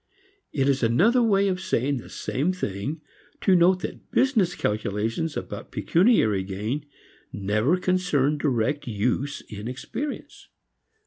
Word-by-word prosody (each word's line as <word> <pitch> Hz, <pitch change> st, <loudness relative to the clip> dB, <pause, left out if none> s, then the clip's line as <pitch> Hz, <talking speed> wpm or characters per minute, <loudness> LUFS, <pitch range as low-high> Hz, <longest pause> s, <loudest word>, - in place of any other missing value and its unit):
It 135 Hz, -2 st, +1 dB
is 135 Hz, -1 st, +2 dB
another 180 Hz, -, +4 dB
way 200 Hz, -3 st, +3 dB
of 185 Hz, -1 st, -1 dB
saying 140 Hz, -7 st, 0 dB
the 120 Hz, -, -9 dB
same 145 Hz, +8 st, -1 dB
thing 140 Hz, -, -4 dB, 0.4 s
to 190 Hz, -, +4 dB
note 180 Hz, +1 st, +4 dB
that -, -, -7 dB
business 220 Hz, -10 st, +2 dB
calculations 110 Hz, +8 st, -2 dB
about -, -, -6 dB
pecuniary 165 Hz, -, +3 dB
gain 105 Hz, +10 st, -4 dB, 0.4 s
never 105 Hz, -, +1 dB
concern 180 Hz, -6 st, +1 dB
direct 135 Hz, 0 st, 0 dB
use 120 Hz, +6 st, -1 dB
in 105 Hz, +1 st, -8 dB
experience. 230 Hz, -, -6 dB
145 Hz, 125 wpm, -25 LUFS, 110-185 Hz, 0.4 s, another